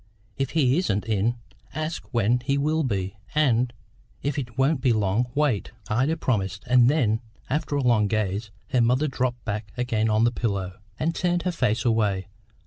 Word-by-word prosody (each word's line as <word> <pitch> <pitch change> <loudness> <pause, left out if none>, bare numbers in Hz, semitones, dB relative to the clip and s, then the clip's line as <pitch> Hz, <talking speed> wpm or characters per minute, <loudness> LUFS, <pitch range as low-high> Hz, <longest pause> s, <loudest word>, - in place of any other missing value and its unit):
If 135 -1 -1
he 135 +1 +4
isn't 105 - 0
in, 110 +1 +1 0.4
ask 155 +1 -4
when 120 0 +2
he 135 +3 0
will 155 +3 +1
be, 100 -7 -2 0.2
and, 125 -5 +3 0.5
if 145 0 -1
it 120 -4 -7
won't 135 +1 +2
be 125 -2 +3
long, 105 +3 +1
wait." 140 -8 0 0.2
Ida 130 +9 +1
promised, 100 -8 -1
and 125 -1 +5
then, 115 -7 +2 0.3
after 150 0 -1
a 140 - 0
long 115 -4 +3
gaze, 105 0 -1 0.2
her 125 -3 +3
mother 125 +6 +3
dropped 125 -3 -2
back 105 -1 -4
again 115 -3 0
on 110 +1 +3
the 120 - +4
pillow, 100 -6 -3 0.2
and 165 +2 0
turned 175 -1 0
her 180 - 0
face 115 -8 0
away. 105 -5 +1
120 Hz, 175 wpm, -25 LUFS, 105-140 Hz, 0.5 s, and